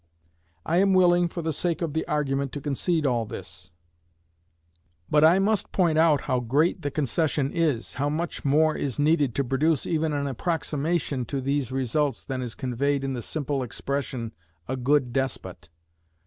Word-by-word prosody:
I 170 Hz, -, +1 dB
am 195 Hz, 0 st, +4 dB
willing, 175 Hz, -1 st, +5 dB
for 170 Hz, 0 st, -6 dB
the 160 Hz, 0 st, -1 dB
sake 170 Hz, +3 st, -1 dB
of 160 Hz, -3 st, -2 dB
the 160 Hz, -, 0 dB
argument, 140 Hz, -2 st, -1 dB
to 145 Hz, -, -4 dB
concede 150 Hz, +3 st, -1 dB
all 120 Hz, -4 st, +1 dB
this, 95 Hz, -5 st, -9 dB, 1.4 s
but 150 Hz, 0 st, +5 dB
I 165 Hz, +4 st, +7 dB
must 205 Hz, +2 st, +1 dB
point 165 Hz, -4 st, +2 dB
out 160 Hz, -3 st, +4 dB
how 130 Hz, -, 0 dB
great 145 Hz, +9 st, +1 dB
the 145 Hz, -, -2 dB
concession 145 Hz, 0 st, 0 dB
is, 155 Hz, -9 st, 0 dB
how 145 Hz, +2 st, -1 dB
much 165 Hz, +3 st, -3 dB
more 155 Hz, +3 st, +3 dB
is 135 Hz, -5 st, -3 dB
needed 145 Hz, -4 st, +2 dB
to 140 Hz, -, +1 dB
produce 140 Hz, +4 st, +1 dB
even 160 Hz, -1 st, 0 dB
an 145 Hz, -1 st, -1 dB
approximation 150 Hz, 0 st, -1 dB
to 140 Hz, +3 st, -3 dB
these 135 Hz, -1 st, -1 dB
results 135 Hz, +1 st, 0 dB
than 130 Hz, -1 st, -4 dB
is 120 Hz, -3 st, -5 dB
conveyed 135 Hz, +2 st, -1 dB
in 135 Hz, -1 st, -2 dB
the 125 Hz, -, -4 dB
simple 145 Hz, +2 st, -2 dB
expression, 130 Hz, -1 st, -3 dB, 0.4 s
a 130 Hz, -, -2 dB
good 130 Hz, -1 st, +1 dB
despot. 95 Hz, -11 st, -3 dB
145 Hz, 170 wpm, -26 LUFS, 130-160 Hz, 1.4 s, I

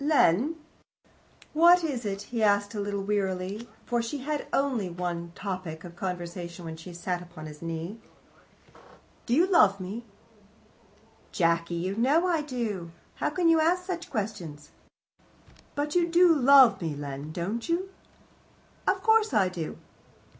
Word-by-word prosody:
"Len 290 Hz, -, +3 dB, 0.5 s
" -, -, -33 dB, 0.3 s
"What 345 Hz, +3 st, +6 dB
is 265 Hz, -8 st, -2 dB
it?" 200 Hz, 0 st, -3 dB
he 230 Hz, -, 0 dB
asked, 205 Hz, 0 st, +2 dB
a 210 Hz, -, -4 dB
little 200 Hz, -1 st, -2 dB
wearily, 195 Hz, +1 st, -2 dB, 0.2 s
for 240 Hz, -1 st, 0 dB
she 260 Hz, +4 st, -5 dB, 0.2 s
only 260 Hz, -8 st, +1 dB
had 175 Hz, 0 st, -9 dB
one 170 Hz, -1 st, -3 dB
topic 185 Hz, -5 st, -5 dB
of 175 Hz, -1 st, -10 dB
conversation 175 Hz, -1 st, -5 dB
when 160 Hz, -1 st, -6 dB
she 165 Hz, +3 st, -10 dB
sat 175 Hz, +1 st, -3 dB
upon 175 Hz, -3 st, -10 dB
his 150 Hz, -1 st, -10 dB
knee. 165 Hz, +6 st, -5 dB, 1.3 s
"You 275 Hz, +9 st, +4 dB
do 380 Hz, -, -6 dB
love 200 Hz, -, +5 dB
me?" 195 Hz, +6 st, -6 dB, 1.3 s
"Jacky, 170 Hz, -1 st, +1 dB
you 180 Hz, +3 st, -2 dB
know 270 Hz, +9 st, +3 dB
that -, -, -1 dB
I 330 Hz, -3 st, +2 dB
do. 230 Hz, -, -4 dB, 0.3 s
How -, -, 0 dB
can 360 Hz, -2 st, +1 dB
you 325 Hz, -1 st, +5 dB
ask 355 Hz, +3 st, +2 dB
such 360 Hz, -1 st, -4 dB
questions!" 185 Hz, -, -5 dB, 1.0 s
"But 295 Hz, +1 st, -2 dB
you 345 Hz, -1 st, +3 dB
do 345 Hz, 0 st, +6 dB
love 275 Hz, -5 st, +6 dB
me, 160 Hz, -3 st, -2 dB
Len, 145 Hz, +1 st, -6 dB
don't 200 Hz, -, -3 dB
you?" 360 Hz, +3 st, 0 dB, 1.0 s
"Of -, -, +1 dB
course 440 Hz, -, +4 dB
I 195 Hz, -3 st, +4 dB
do." 170 Hz, -4 st, -5 dB
205 Hz, 155 wpm, -28 LUFS, 175-290 Hz, 1.3 s, What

